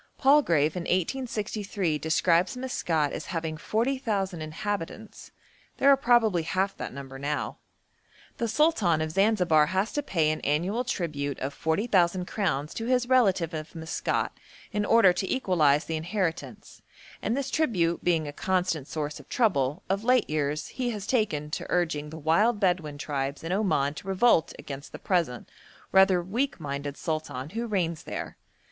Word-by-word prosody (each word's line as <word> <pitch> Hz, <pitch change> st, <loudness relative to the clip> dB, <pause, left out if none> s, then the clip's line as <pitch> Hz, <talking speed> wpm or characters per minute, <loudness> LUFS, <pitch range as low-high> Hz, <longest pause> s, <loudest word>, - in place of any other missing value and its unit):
Palgrave 175 Hz, -, +4 dB
in 180 Hz, -, -2 dB
1863 200 Hz, -, -1 dB
describes 170 Hz, -, +2 dB
Maskat 165 Hz, -, -1 dB
as -, -, -5 dB
having 160 Hz, -2 st, -3 dB
40,000 215 Hz, -, -1 dB
inhabitants; 205 Hz, +5 st, -5 dB, 0.5 s
there 280 Hz, -, +5 dB
are -, -, +8 dB
probably 235 Hz, -8 st, +3 dB
half 190 Hz, +4 st, -1 dB
that -, -, -5 dB
number 135 Hz, 0 st, -8 dB
now. 145 Hz, +1 st, -3 dB, 0.8 s
The 235 Hz, -, -1 dB
Sultan 220 Hz, -, +2 dB
of 155 Hz, 0 st, -2 dB
Zanzibar 180 Hz, -6 st, +3 dB
has 190 Hz, +6 st, -1 dB
to 290 Hz, -, 0 dB
pay 165 Hz, -, +1 dB
an 155 Hz, -, -3 dB
annual 175 Hz, -, 0 dB
tribute 150 Hz, -, -3 dB
of 135 Hz, +2 st, -4 dB
40,000 180 Hz, 0 st, +1 dB
crowns 160 Hz, -8 st, -2 dB
to 225 Hz, -, -4 dB
his 250 Hz, -1 st, +2 dB
relative 195 Hz, -10 st, +3 dB
of 155 Hz, 0 st, -6 dB
Maskat 160 Hz, 0 st, -2 dB, 0.4 s
in 210 Hz, 0 st, -1 dB
order 225 Hz, -5 st, +6 dB
to 190 Hz, +1 st, -3 dB
equalise 160 Hz, -, +2 dB
the 160 Hz, -, -2 dB
inheritance, 175 Hz, +1 st, -4 dB, 0.4 s
and 235 Hz, -, -1 dB
this 280 Hz, -, -2 dB
tribute 180 Hz, -, +1 dB
being 165 Hz, -3 st, +1 dB
a 145 Hz, -, -6 dB
constant 180 Hz, -5 st, -1 dB
source 150 Hz, -1 st, -4 dB
of -, -, -16 dB
trouble, 170 Hz, -, +1 dB
of 195 Hz, +2 st, -1 dB
late 250 Hz, -1 st, +3 dB
years 150 Hz, 0 st, -2 dB
he 250 Hz, -2 st, -2 dB
has 210 Hz, -4 st, -4 dB
taken 160 Hz, -, 0 dB
to -, -, -4 dB
urging 160 Hz, -4 st, 0 dB
the 160 Hz, -, -8 dB
wild 200 Hz, +9 st, +2 dB
Bedouin 175 Hz, -7 st, 0 dB
tribes 140 Hz, -1 st, -3 dB
in 165 Hz, -, -4 dB
Oman 160 Hz, -8 st, +1 dB
to 155 Hz, -, -10 dB
revolt 195 Hz, -3 st, +3 dB
against 140 Hz, 0 st, -8 dB
the -, -, -5 dB
present, 170 Hz, -10 st, -1 dB, 0.4 s
rather 190 Hz, -2 st, +5 dB
weak 235 Hz, +9 st, -2 dB
minded 140 Hz, -1 st, -4 dB
sultan 155 Hz, -3 st, -4 dB
who 230 Hz, +2 st, -3 dB
reigns 170 Hz, -6 st, -1 dB
there. -, -, -6 dB
175 Hz, 155 wpm, -27 LUFS, 155-215 Hz, 0.8 s, are